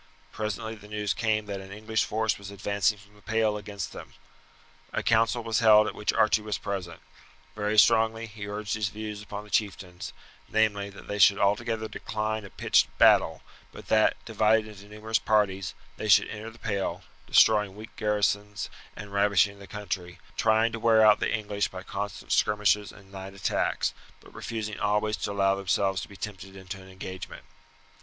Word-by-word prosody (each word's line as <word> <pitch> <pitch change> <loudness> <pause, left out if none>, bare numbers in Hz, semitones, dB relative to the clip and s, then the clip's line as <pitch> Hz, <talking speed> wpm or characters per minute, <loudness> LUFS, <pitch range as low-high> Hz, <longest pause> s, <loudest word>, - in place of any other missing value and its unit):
Presently 110 +1 -4
the 105 -2 -13
news 105 -2 -1
came 110 -2 0
that 100 -1 -5
an 95 0 -11
English 110 +1 -1
force 110 -1 0
was 100 -1 -9
advancing 100 +1 0
from 100 +1 -19
the 105 - -20
Pale 110 -1 +1
against 100 -2 -6
them. - - -11 0.8
A - - -1
council 115 +1 +2
was 115 -1 0
held 110 -2 +7
at - - -3
which 105 - -1
Archie 110 0 +3
was 105 0 -3
present. 95 -4 -5 0.6
Very 105 0 -1
strongly 115 +1 +4
he 105 -2 -8
urged 105 0 -4
his 105 -3 -1
views 105 0 -6
upon 105 0 -7
the 105 - -16
chieftains, 95 -4 -2 0.4
namely: 105 -2 +1
that 100 +1 -13
they 105 - -4
should 100 +1 +7
altogether 110 +2 0
decline 110 0 -3
a 100 - -9
pitched - - +3
battle; - - +5 0.3
but - - -12
that, 110 -1 +4
divided 110 0 +2
into 100 -1 -12
numerous 105 +1 -1
parties, 95 -3 +1 0.2
they 110 - -4
should 100 0 +5
enter 110 +1 -6
the 115 - -16
Pale, 100 -4 -3 0.2
destroying 105 -3 +4
weak 110 +1 -11
garrisons 105 -1 -1 0.2
and 100 -1 -9
ravaging 100 0 +3
the 100 - -11
country, 95 -4 -5 0.2
trying 110 +1 +3
to 115 - -5
wear 110 -1 +5
out 105 -1 +6
the - - 0
English 105 -2 -1
by 95 0 -9
constant 100 -1 -5
skirmishes 105 -1 +2
and 95 -1 -17
night 95 0 -8
attacks, 95 - 0 0.3
but - - -18
refusing 110 -2 -5
always 105 +1 +1
to - - -3
allow 95 -1 +2
themselves 95 -1 0
to - - -7
be 100 - -12
tempted 95 -2 -7
into 95 0 -8
an 95 - -14
engagement. 95 -1 -8
105 Hz, 180 wpm, -27 LUFS, 100-110 Hz, 0.8 s, held